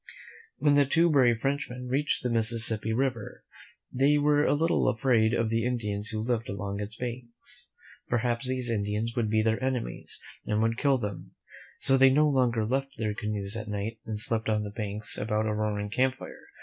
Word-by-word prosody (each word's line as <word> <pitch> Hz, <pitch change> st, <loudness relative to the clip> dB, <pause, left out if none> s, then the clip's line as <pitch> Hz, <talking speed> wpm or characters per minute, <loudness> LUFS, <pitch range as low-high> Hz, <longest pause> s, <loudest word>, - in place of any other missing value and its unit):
When 145 Hz, -, +3 dB
the 145 Hz, -1 st, +4 dB
two 165 Hz, +3 st, +3 dB
brave 120 Hz, -5 st, +3 dB
Frenchmen 130 Hz, -3 st, -3 dB
reached 140 Hz, +3 st, 0 dB
the 125 Hz, -, -1 dB
Mississippi 115 Hz, -1 st, +3 dB
River, 120 Hz, -2 st, -2 dB, 0.5 s
they 140 Hz, +3 st, +3 dB
were 145 Hz, 0 st, +3 dB
a -, -, +3 dB
little 165 Hz, +3 st, +1 dB
afraid 115 Hz, -2 st, +2 dB
of 115 Hz, -1 st, 0 dB
the 115 Hz, 0 st, +1 dB
Indians 105 Hz, -4 st, -2 dB
who 110 Hz, -1 st, -5 dB
lived 115 Hz, 0 st, -2 dB
along 100 Hz, 0 st, -4 dB
its 105 Hz, +1 st, -6 dB
banks. 120 Hz, 0 st, -7 dB, 0.4 s
Perhaps 120 Hz, +1 st, 0 dB
these 130 Hz, -2 st, -1 dB
Indians 105 Hz, +2 st, -2 dB
would 115 Hz, -3 st, 0 dB
be 110 Hz, 0 st, +2 dB
their 110 Hz, +3 st, 0 dB
enemies 125 Hz, -, -3 dB, 0.2 s
and 105 Hz, -, -1 dB
would 115 Hz, +1 st, 0 dB
kill 140 Hz, -2 st, +3 dB
them; 105 Hz, -5 st, -6 dB, 0.4 s
so 135 Hz, -, +3 dB
they 135 Hz, 0 st, +7 dB
no 150 Hz, +3 st, +4 dB
longer 125 Hz, -6 st, +1 dB
left 135 Hz, +3 st, -2 dB
their 110 Hz, -1 st, -1 dB
canoes 105 Hz, -1 st, -3 dB
at 110 Hz, -1 st, -5 dB
night 105 Hz, +2 st, -4 dB
and 110 Hz, -2 st, -5 dB
slept 115 Hz, 0 st, 0 dB
on 105 Hz, -1 st, +1 dB
the 105 Hz, -, -6 dB
banks 105 Hz, -1 st, -3 dB
about 110 Hz, 0 st, -1 dB
a 110 Hz, -, 0 dB
roaring 105 Hz, -1 st, -2 dB
camp 130 Hz, +3 st, +1 dB
fire. -, -, -11 dB
115 Hz, 190 wpm, -28 LUFS, 110-130 Hz, 0.5 s, they